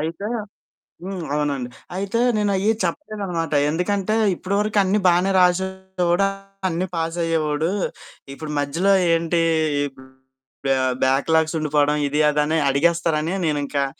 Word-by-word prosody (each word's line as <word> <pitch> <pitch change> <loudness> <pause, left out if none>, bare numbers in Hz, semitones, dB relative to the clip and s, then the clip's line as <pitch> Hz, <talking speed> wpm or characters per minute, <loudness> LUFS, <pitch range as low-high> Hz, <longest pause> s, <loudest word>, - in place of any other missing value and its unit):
అయితే 165 +6 -4 0.8
హ్మ్, 190 -2 -5
అవునండి. 140 -4 -1 0.3
అయితే 200 +4 -2 0.2
నేను 205 -1 +1
అయ్యి 200 +3 +2
చెప్పలేదనమాట 180 - -3 0.2
ఎందుకంటే 195 +6 0 0.2
"ఇప్పటి 185 +3 -3
వరకు 210 0 -1
అన్నీ 195 +2 +2
బాగానే 180 +2 +3
రాసేవాడు, 190 0 +1 0.4
అన్నీ 175 +1 -1
పాస్ 165 +1 -2
అయ్యేవాడు, 160 -1 0 0.6
ఇప్పుడు 150 +2 -7
మధ్యలో 165 +8 +1 0.2
ఏంటి? 165 0 +1 0.4
ఈ - - +1 1.2
బ్యాక్ 135 +4 +2
లాగ్స్ 160 0 +2
ఉండిపోవడం 150 -1 +1
ఇది 150 +2 0
అది." 150 0 +1
అని 160 +1 +1
అడిగేస్తారని 165 +2 +1
నేనింకా 145 -2 0
170 Hz, 120 wpm, -22 LUFS, 150-190 Hz, 1.2 s, బాగానే